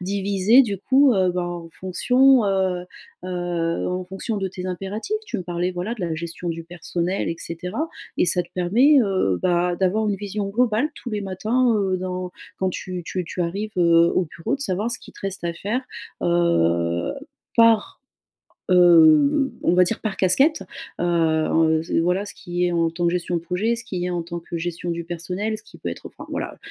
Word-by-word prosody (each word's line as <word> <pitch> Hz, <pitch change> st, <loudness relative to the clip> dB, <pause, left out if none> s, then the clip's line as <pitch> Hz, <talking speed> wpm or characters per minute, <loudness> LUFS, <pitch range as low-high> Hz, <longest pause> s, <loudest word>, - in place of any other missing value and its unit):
divisée, 200 Hz, +5 st, +3 dB
du 205 Hz, -5 st, -3 dB
coup, 265 Hz, +5 st, +4 dB
heu, 185 Hz, -2 st, +3 dB
ben 180 Hz, 0 st, -1 dB
en 175 Hz, -1 st, -6 dB
fonction, 250 Hz, +9 st, +3 dB
heu 190 Hz, -2 st, 0 dB, 0.4 s
heu, -, -, -5 dB, 0.6 s
en 180 Hz, 0 st, -3 dB
fonction 190 Hz, +4 st, -4 dB
de 195 Hz, -1 st, -2 dB
tes 185 Hz, 0 st, -7 dB
impératifs. 195 Hz, -, -3 dB
Tu 235 Hz, -, -3 dB
me -, -, -4 dB
parlais 175 Hz, 0 st, -2 dB
voilà, 180 Hz, +6 st, -3 dB
de 230 Hz, -, -11 dB
la 170 Hz, -3 st, -2 dB
gestion 170 Hz, +2 st, -5 dB
du 165 Hz, 0 st, -4 dB
personnel 175 Hz, +2 st, -3 dB
et 165 Hz, -, -3 dB
cetera 180 Hz, -, -4 dB, 0.3 s
et -, -, +4 dB
ça 180 Hz, 0 st, +2 dB
te 175 Hz, -, -18 dB
permet, 235 Hz, +12 st, +4 dB
heu, 185 Hz, -, +1 dB
bah, 175 Hz, 0 st, +1 dB
d'avoir 195 Hz, +4 st, +1 dB
une 200 Hz, -, 0 dB
vision 205 Hz, 0 st, -4 dB
globale 235 Hz, +6 st, +1 dB
tous 245 Hz, -, -8 dB
les 210 Hz, -1 st, -2 dB
matins, 225 Hz, +6 st, +1 dB
heu, 190 Hz, -2 st, +1 dB
dans, 180 Hz, 0 st, -4 dB, 0.3 s
quand 190 Hz, 0 st, 0 dB
tu 180 Hz, 0 st, -5 dB
tu 180 Hz, +1 st, -3 dB
tu 180 Hz, -, -6 dB
arrives, 200 Hz, +5 st, -3 dB
heu, 170 Hz, -1 st, +5 dB
au 185 Hz, -, +1 dB
bureau 165 Hz, +11 st, -1 dB
de -, -, -20 dB
savoir 210 Hz, -2 st, -1 dB
ce -, -, -1 dB
qui -, -, -15 dB
te -, -, -15 dB
reste 195 Hz, -2 st, -4 dB
à 170 Hz, -, -1 dB
faire, 215 Hz, +9 st, -2 dB, 0.4 s
heu, 85 Hz, -, +1 dB, 0.4 s
par, 230 Hz, -2 st, +4 dB, 0.7 s
heu, 180 Hz, -, +6 dB
on -, -, +3 dB
va 180 Hz, 0 st, +6 dB
dire 210 Hz, +5 st, -1 dB
par 215 Hz, -3 st, -2 dB
casquette, 275 Hz, -, +3 dB, 0.4 s
heu, -, -, 0 dB
en 160 Hz, -1 st, +2 dB
ce 165 Hz, -, 0 dB
voilà, 180 Hz, +4 st, +1 dB
ce -, -, -7 dB
qui 175 Hz, 0 st, -2 dB
est, 175 Hz, -, 0 dB
en 165 Hz, -1 st, +2 dB
tant 170 Hz, +1 st, -2 dB
que -, -, +2 dB
gestion 175 Hz, 0 st, -1 dB
de -, -, -5 dB
projet, 185 Hz, +7 st, 0 dB
ce 235 Hz, -, -7 dB
qui 180 Hz, -2 st, -3 dB
est -, -, -2 dB
en 175 Hz, -1 st, -1 dB
tant 170 Hz, +1 st, -6 dB
que 170 Hz, 0 st, -6 dB
gestion 175 Hz, +1 st, -3 dB
du 170 Hz, 0 st, -4 dB
personnel, 180 Hz, +6 st, -3 dB
ce -, -, -13 dB
qui -, -, -16 dB
peut -, -, -4 dB
être -, -, -8 dB
enfin -, -, -12 dB
voilà, -, -, -4 dB
heu. -, -, -27 dB
180 Hz, 210 wpm, -23 LUFS, 170-210 Hz, 0.7 s, heu